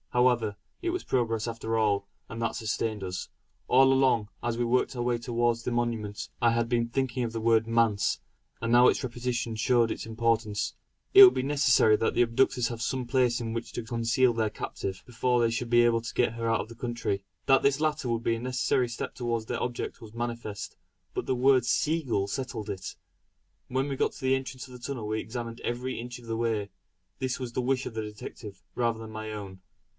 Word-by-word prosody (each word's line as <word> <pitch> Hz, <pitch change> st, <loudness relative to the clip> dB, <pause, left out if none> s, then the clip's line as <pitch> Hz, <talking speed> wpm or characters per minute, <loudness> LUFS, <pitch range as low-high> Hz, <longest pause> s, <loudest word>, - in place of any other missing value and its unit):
However, 120 Hz, -4 st, +2 dB, 0.2 s
it 355 Hz, -, -1 dB
was 365 Hz, +1 st, -2 dB
progress 115 Hz, -3 st, 0 dB
after 115 Hz, -1 st, -2 dB
all; 100 Hz, -2 st, +1 dB, 0.2 s
and 115 Hz, 0 st, -6 dB
that 115 Hz, -, -1 dB
sustained 110 Hz, -1 st, -2 dB
us. 90 Hz, -1 st, -4 dB, 0.4 s
All 135 Hz, +1 st, +6 dB
along, 130 Hz, -5 st, +3 dB, 0.2 s
as 120 Hz, -1 st, -1 dB
we 120 Hz, -, +1 dB
worked 125 Hz, +2 st, +1 dB
our 120 Hz, -, -2 dB
way 120 Hz, 0 st, +1 dB
towards 120 Hz, 0 st, 0 dB
the 125 Hz, -, -2 dB
monument, 115 Hz, -3 st, -2 dB
I 120 Hz, -, +5 dB
had 115 Hz, 0 st, +1 dB
been 115 Hz, -1 st, +1 dB
thinking 130 Hz, 0 st, -1 dB
of 115 Hz, -, -2 dB
the 115 Hz, -, -2 dB
word 115 Hz, 0 st, +3 dB
"manse;" 115 Hz, -3 st, +2 dB, 0.4 s
and 115 Hz, 0 st, -2 dB
now 125 Hz, +1 st, +8 dB
its -, -, +2 dB
repetition 120 Hz, -2 st, -2 dB
showed 120 Hz, 0 st, +3 dB
its -, -, -4 dB
importance. 110 Hz, -2 st, 0 dB, 0.4 s
It 400 Hz, 0 st, +12 dB
would 380 Hz, -, +9 dB
be -, -, 0 dB
necessary 135 Hz, -6 st, +4 dB
that 115 Hz, -, 0 dB
the -, -, +5 dB
abductors 120 Hz, +1 st, +2 dB
have 115 Hz, -2 st, -5 dB
some 130 Hz, +2 st, -1 dB
place 125 Hz, -1 st, +2 dB
in 115 Hz, -1 st, -3 dB
which 115 Hz, 0 st, -4 dB
to 120 Hz, -, -4 dB
conceal 120 Hz, +2 st, +2 dB
their 110 Hz, -2 st, 0 dB
captive, 95 Hz, -2 st, -5 dB
before 125 Hz, +1 st, +1 dB
they 115 Hz, -1 st, +3 dB
should 115 Hz, +1 st, -2 dB
be 120 Hz, 0 st, +5 dB
able 115 Hz, -1 st, +3 dB
to 115 Hz, -, -6 dB
get 120 Hz, -, +2 dB
her 115 Hz, 0 st, -2 dB
out 115 Hz, -, +2 dB
of -, -, -7 dB
the 115 Hz, -, -11 dB
country. 115 Hz, -4 st, -2 dB, 0.2 s
That 135 Hz, 0 st, +5 dB
this 140 Hz, 0 st, +2 dB
latter 150 Hz, -5 st, 0 dB
would 115 Hz, -1 st, -1 dB
be 115 Hz, -, +2 dB
a -, -, -5 dB
necessary 125 Hz, 0 st, 0 dB
step 120 Hz, -, -5 dB
towards 115 Hz, -2 st, -2 dB
their 120 Hz, +1 st, -2 dB
object 120 Hz, -1 st, -4 dB
was 110 Hz, -1 st, -11 dB
manifest; 115 Hz, -4 st, -4 dB, 0.4 s
but -, -, -3 dB
the 130 Hz, -, 0 dB
word 130 Hz, 0 st, +4 dB
Seagull 125 Hz, -5 st, +1 dB
settled 110 Hz, -1 st, -4 dB
it. 95 Hz, -1 st, -5 dB, 0.7 s
When 130 Hz, +2 st, 0 dB
we 140 Hz, -, -2 dB
got -, -, 0 dB
to -, -, -12 dB
the 130 Hz, 0 st, +3 dB
entrance 130 Hz, -1 st, -5 dB
of 130 Hz, -, -13 dB
the 125 Hz, -, -10 dB
tunnel 120 Hz, -3 st, -5 dB
we 110 Hz, +1 st, -1 dB
examined 115 Hz, 0 st, -6 dB
every 125 Hz, +1 st, -3 dB
inch 120 Hz, +1 st, -7 dB
of 120 Hz, -, -14 dB
the 115 Hz, 0 st, -3 dB
way; 110 Hz, -3 st, -1 dB, 0.5 s
this 130 Hz, -1 st, -2 dB
was 125 Hz, -2 st, -5 dB
the 130 Hz, -, 0 dB
wish 130 Hz, +1 st, 0 dB
of -, -, -5 dB
the 110 Hz, -, -2 dB
detective 105 Hz, -1 st, -8 dB
rather 115 Hz, -2 st, 0 dB
than 110 Hz, -1 st, -8 dB
my 110 Hz, 0 st, -5 dB
own. 100 Hz, -3 st, -7 dB
120 Hz, 220 wpm, -28 LUFS, 115-125 Hz, 0.7 s, It